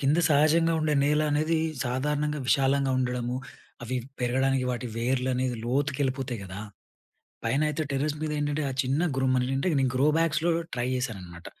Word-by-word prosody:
కింద 145 Hz, +4 st, +2 dB
సహజంగా 155 Hz, +3 st, +4 dB
ఉండే 155 Hz, -1 st, +1 dB
నేల 150 Hz, +1 st, +3 dB
అనేది 155 Hz, +2 st, +1 dB, 0.3 s
సాధారణంగా 150 Hz, +4 st, -1 dB
విశాలంగా 135 Hz, -1 st, +3 dB
ఉండడము, 125 Hz, -1 st, -1 dB, 0.5 s
అవి 125 Hz, +2 st, -3 dB, 0.2 s
పెరగడానికి 130 Hz, +1 st, +1 dB
వాటి 125 Hz, 0 st, -3 dB
వేర్లనేది 125 Hz, 0 st, 0 dB
లోతుకు 140 Hz, +3 st, 0 dB
వెళ్ళిపోతాయి 130 Hz, -3 st, -1 dB
కదా! 95 Hz, +1 st, -8 dB, 0.9 s
పైన 120 Hz, +5 st, +1 dB
అయితే 150 Hz, +1 st, -1 dB
టెర్రస్ 145 Hz, +2 st, -1 dB
మీద 155 Hz, -, -1 dB
ఏంటంటే, 145 Hz, +1 st, -1 dB
ఆ -, -, -3 dB
చిన్న 135 Hz, +4 st, 0 dB, 0.2 s
గ్రూమ్ 130 Hz, -1 st, +2 dB
మన 125 Hz, 0 st, 0 dB
అంటే 135 Hz, -, 0 dB
నేను 130 Hz, -1 st, +1 dB
గ్రో 140 Hz, +3 st, +3 dB
బ్యాక్స్‌లో 165 Hz, +1 st, +2 dB, 0.2 s
ట్రై 120 Hz, 0 st, -1 dB
చేశాననమాట. 95 Hz, -9 st, -5 dB
135 Hz, 155 wpm, -27 LUFS, 125-150 Hz, 0.9 s, సహజంగా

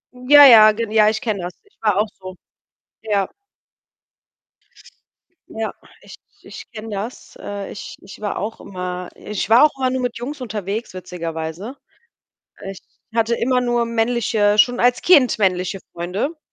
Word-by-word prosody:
Ja, 285 Hz, +3 st, +7 dB
ja, 215 Hz, -4 st, +9 dB
gen 225 Hz, -1 st, -4 dB
ja, 215 Hz, -1 st, +5 dB
ich 220 Hz, -, -2 dB
kenne 210 Hz, -5 st, -2 dB
das. 175 Hz, +1 st, -6 dB
Ich 405 Hz, -, -30 dB
war 210 Hz, -3 st, +1 dB
auch 215 Hz, +1 st, +2 dB
so. 185 Hz, 0 st, -9 dB, 0.7 s
Ja. 205 Hz, -3 st, -1 dB, 2.2 s
Ja, 220 Hz, 0 st, -4 dB, 0.3 s
ich -, -, -13 dB, 0.3 s
ich -, -, -11 dB
kenne 225 Hz, 0 st, -8 dB
das. 210 Hz, +4 st, -7 dB
Äh, 200 Hz, -1 st, -6 dB
ich -, -, -9 dB
ich 195 Hz, -, -13 dB
war 205 Hz, -, -3 dB
auch 215 Hz, +3 st, -5 dB
immer 180 Hz, -2 st, -6 dB
ich 210 Hz, 0 st, -5 dB
war 235 Hz, +6 st, +7 dB
auch 305 Hz, -, +5 dB
immer 260 Hz, -1 st, 0 dB
nur 260 Hz, 0 st, -2 dB
mit 245 Hz, -2 st, -3 dB
Jungs 270 Hz, +4 st, -6 dB
unterwegs 215 Hz, -2 st, -5 dB
witzigerweise. 175 Hz, -, -6 dB, 0.8 s
Äh, 195 Hz, -, -7 dB
ich 195 Hz, -, -11 dB, 0.4 s
hatte 230 Hz, +1 st, +2 dB
immer 250 Hz, +2 st, +1 dB
nur 240 Hz, -1 st, 0 dB
männliche 225 Hz, -3 st, +1 dB
schon 245 Hz, +3 st, +4 dB
als 245 Hz, +1 st, +2 dB
Kind 280 Hz, -10 st, +4 dB
männliche 185 Hz, -1 st, 0 dB
Freunde. 195 Hz, -, -3 dB
215 Hz, 155 wpm, -20 LUFS, 195-240 Hz, 2.2 s, ja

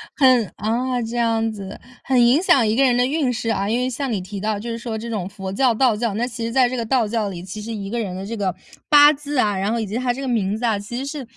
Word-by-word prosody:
很 255 Hz, -6 st, +4 dB
啊， 245 Hz, +4 st, -1 dB
这 235 Hz, +1 st, -4 dB
样 225 Hz, -1 st, +1 dB
子。 200 Hz, -3 st, -8 dB, 0.2 s
很 255 Hz, -2 st, +3 dB
影 255 Hz, +7 st, +4 dB
响 270 Hz, -10 st, +4 dB
一 215 Hz, -, +1 dB
个 270 Hz, -, +3 dB
人 250 Hz, -2 st, +3 dB
的 245 Hz, -, +3 dB
运 275 Hz, -1 st, 0 dB
势 230 Hz, -1 st, -3 dB
啊。 200 Hz, -2 st, 0 dB
因 230 Hz, -, +1 dB
为 255 Hz, +1 st, 0 dB
像 265 Hz, +1 st, -3 dB
你 210 Hz, -, -1 dB
提 195 Hz, +2 st, -7 dB
到 215 Hz, 0 st, -1 dB
就 235 Hz, +3 st, -6 dB
是 230 Hz, -, -3 dB
说 230 Hz, -1 st, -5 dB
这 230 Hz, +2 st, -6 dB
种 205 Hz, -6 st, -3 dB
佛 195 Hz, -1 st, -7 dB
教、 255 Hz, +2 st, +3 dB
道 240 Hz, -1 st, +3 dB
教。 225 Hz, 0 st, -1 dB
那 235 Hz, +3 st, 0 dB
其 235 Hz, -1 st, -6 dB
实 230 Hz, -, -3 dB
在 255 Hz, 0 st, +4 dB
这 255 Hz, -, -3 dB
个 230 Hz, -, -2 dB
道 240 Hz, -2 st, +1 dB
教 215 Hz, -1 st, -1 dB
里， 175 Hz, -2 st, -7 dB
其 190 Hz, +3 st, -7 dB
实 230 Hz, +2 st, -6 dB
一 200 Hz, -3 st, -5 dB
个 235 Hz, +2 st, -2 dB
人 190 Hz, -5 st, -4 dB
的 190 Hz, +1 st, -6 dB
这 230 Hz, +3 st, -5 dB
个， 190 Hz, -4 st, -1 dB, 0.3 s
八 290 Hz, -1 st, +8 dB
字 295 Hz, 0 st, -5 dB
啊， 210 Hz, -5 st, +2 dB
然 195 Hz, +3 st, -1 dB
后 235 Hz, -, 0 dB
以 220 Hz, -, -2 dB
及 205 Hz, -, -6 dB
他 245 Hz, 0 st, 0 dB
这 265 Hz, -, -7 dB
个 270 Hz, -, -4 dB
名 210 Hz, -5 st, 0 dB
字 240 Hz, -, -3 dB
啊， 220 Hz, -3 st, +2 dB
其 210 Hz, +4 st, -7 dB
实 265 Hz, -, -3 dB
是， 280 Hz, 0 st, -5 dB
230 Hz, 335 characters per minute, -21 LUFS, 210-250 Hz, 0.3 s, 八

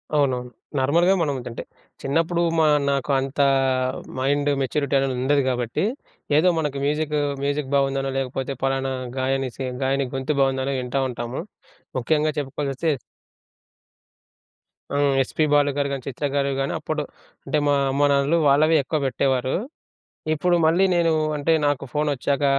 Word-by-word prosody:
అవునవును. 130 Hz, -4 st, +1 dB, 0.3 s
నార్మల్‌గా 170 Hz, +8 st, +3 dB
మనం 145 Hz, -4 st, 0 dB
అంటే, 115 Hz, -, -6 dB, 0.4 s
చిన్నప్పుడు 165 Hz, +5 st, 0 dB, 0.2 s
మా 155 Hz, -, +4 dB, 0.2 s
నాకు 140 Hz, 0 st, -1 dB
అంత 135 Hz, +1 st, -5 dB, 0.8 s
మైండ్ 145 Hz, +2 st, +1 dB
మెచ్యూరిటీ 140 Hz, +1 st, 0 dB
అనేది 135 Hz, -1 st, 0 dB
ఉండదు 140 Hz, +2 st, +3 dB
కాబట్టి. 120 Hz, +2 st, -1 dB, 0.5 s
ఏదో 180 Hz, +4 st, +5 dB
మనకు 150 Hz, -3 st, -2 dB
మ్యూజిక్, 150 Hz, +1 st, 0 dB, 0.3 s
మ్యూజిక్ 140 Hz, -1 st, -1 dB
బాగుందనో 135 Hz, -1 st, +1 dB
లేకపోతే 135 Hz, +1 st, -2 dB
పలానా 135 Hz, 0 st, 0 dB, 0.2 s
గాయని, 135 Hz, 0 st, 0 dB
సీ 135 Hz, -, -4 dB, 0.2 s
గాయని 135 Hz, +1 st, +1 dB
గొంతు 135 Hz, +3 st, -1 dB
బాగుందనో 135 Hz, 0 st, +1 dB
వింటా 125 Hz, +2 st, -1 dB
ఉంటాము. 120 Hz, +2 st, -4 dB, 0.6 s
ముఖ్యంగా 150 Hz, +4 st, +1 dB
చెప్పుకోవాల్సిసొస్తే 140 Hz, +2 st, -2 dB, 2.0 s
ఆ! -, -, +2 dB, 0.2 s
ఎస్పీ 155 Hz, +4 st, -1 dB
బాలు 145 Hz, -1 st, +4 dB
గారు 140 Hz, -1 st, +1 dB
కానీ, 135 Hz, -2 st, -3 dB
చిత్ర 140 Hz, +2 st, -3 dB
గారు 140 Hz, 0 st, +1 dB
కానీ 135 Hz, -, -1 dB
అప్పుడు 155 Hz, -1 st, -3 dB, 0.4 s
అంటే 155 Hz, -, 0 dB
మా 145 Hz, -, +4 dB, 0.2 s
అమ్మానాన్నలు 140 Hz, +3 st, +2 dB
వాళ్ళవి 155 Hz, +3 st, +4 dB
ఎక్కువ 155 Hz, +3 st, -2 dB
పెట్టేవారు. 130 Hz, -1 st, 0 dB, 0.8 s
ఇప్పుడు 175 Hz, +3 st, +2 dB
మళ్ళీ 170 Hz, +4 st, +4 dB
నేను 170 Hz, -2 st, +3 dB, 0.2 s
అంటే 150 Hz, +3 st, +1 dB
నాకు 145 Hz, -1 st, 0 dB
ఫోన్ 150 Hz, 0 st, 0 dB
వచ్చాక, 140 Hz, +1 st, -1 dB
140 Hz, 135 wpm, -23 LUFS, 135-150 Hz, 2.0 s, ఏదో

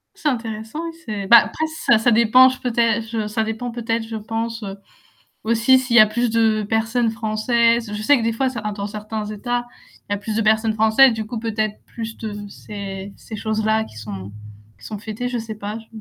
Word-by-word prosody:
C'est 305 Hz, -, -3 dB
intéressant 225 Hz, +3 st, -4 dB
oui, 330 Hz, -, -4 dB
c'est 205 Hz, -3 st, -4 dB
bah 235 Hz, 0 st, +10 dB
après 315 Hz, -, -3 dB, 0.2 s
ça 235 Hz, -, +6 dB
ça 240 Hz, -, +3 dB
dépend 235 Hz, +3 st, +6 dB
je 255 Hz, -, -6 dB
peut-être, 230 Hz, -2 st, +1 dB
je 220 Hz, -1 st, -2 dB
ça 220 Hz, +1 st, -1 dB
dépend 225 Hz, +2 st, -4 dB
peut-être 230 Hz, -1 st, -2 dB
je 225 Hz, -, -6 dB
pense, 225 Hz, +1 st, -4 dB
heu, 195 Hz, -1 st, -5 dB, 0.7 s
aussi 230 Hz, +3 st, +4 dB
s'il 250 Hz, -2 st, 0 dB
y -, -, +10 dB
a 215 Hz, -, +8 dB
plus 240 Hz, +3 st, 0 dB
de 220 Hz, -1 st, +2 dB
personnes 225 Hz, +2 st, 0 dB
françaises, 230 Hz, +1 st, +1 dB
je 210 Hz, -, -4 dB
sais 290 Hz, +5 st, +5 dB
que -, -, -3 dB
des 230 Hz, 0 st, +1 dB
fois, 265 Hz, +4 st, 0 dB
heu, -, -, +3 dB
certains 215 Hz, -4 st, -4 dB
dans 200 Hz, 0 st, -4 dB
certains 215 Hz, +1 st, -5 dB
états, 240 Hz, +3 st, -3 dB, 0.4 s
il -, -, -3 dB
y -, -, +3 dB
a -, -, -3 dB
plus 215 Hz, +1 st, -4 dB
de 225 Hz, -, +2 dB
personnes 220 Hz, 0 st, +2 dB
françaises, 220 Hz, +4 st, +5 dB
du 220 Hz, -1 st, -4 dB
coup 230 Hz, 0 st, -5 dB
peut-être 215 Hz, -2 st, -2 dB
plus 225 Hz, -1 st, -7 dB
de 220 Hz, -2 st, -5 dB, 0.2 s
ces 200 Hz, -1 st, -7 dB
ces 220 Hz, -, -10 dB
choses-là 220 Hz, 0 st, 0 dB
qui 110 Hz, -, -15 dB
sont 100 Hz, -2 st, -7 dB, 0.5 s
qui 110 Hz, -, -17 dB
sont 210 Hz, -, -6 dB
fêtées, 220 Hz, +3 st, -4 dB
je 245 Hz, -, -3 dB
sais 225 Hz, -1 st, -6 dB
pas 210 Hz, +1 st, -5 dB
je 225 Hz, -, -14 dB
220 Hz, 225 wpm, -21 LUFS, 215-235 Hz, 0.7 s, bah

